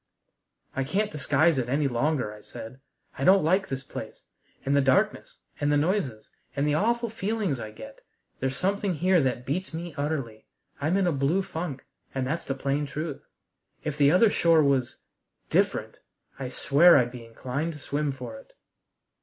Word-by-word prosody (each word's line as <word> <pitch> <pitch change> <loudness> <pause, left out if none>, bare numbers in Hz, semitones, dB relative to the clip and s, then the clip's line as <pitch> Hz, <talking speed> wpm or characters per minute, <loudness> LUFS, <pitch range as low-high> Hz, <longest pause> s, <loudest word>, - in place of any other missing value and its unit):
"I 135 - 0
can't 200 +10 0
disguise 150 +1 +2
it 120 -1 -2
any 140 +2 +2
longer," 125 -2 0
I 105 - -13
said; 115 +3 -10 0.4
"I - - -1
don't 190 +3 +6
like 185 +5 +2
this 135 0 -4
place, - - -8 0.4
and 140 +1 +2
the 140 - +5
darkness, 135 -1 +1 0.2
and 145 0 +1
the 145 - +4
noises, 145 - -1 0.3
and 140 +1 +1
the 150 - +2
awful 235 +8 +1
feelings 210 - -2
I 110 - -5
get. 110 0 -11 0.4
There's 135 0 -1
something 200 -1 0
here 180 +2 +3
that 125 -2 -1
beats 160 +5 -3
me 170 0 -5
utterly. 135 -7 -3 0.3
I'm 160 +7 +2
in 195 - +2
a 175 - +2
blue 145 +7 +1
funk, 160 -7 -5 0.3
and 130 -1 0
that's 160 +6 -2
the 135 - -2
plain 140 +2 -1
truth. 150 +1 -5 0.6
If 150 - -2
the 145 -1 +5
other 205 +5 +5
shore 165 -4 +4
was 135 -3 +1 0.5
different, - - +1 0.4
I 130 -2 -4
swear 150 +7 +6
I'd 120 -2 +2
be 125 -2 -9
inclined 130 +8 -4
to 150 - -10
swim 145 0 -1
for 125 -4 -7
it!" - - -19
145 Hz, 180 wpm, -27 LUFS, 130-170 Hz, 0.6 s, don't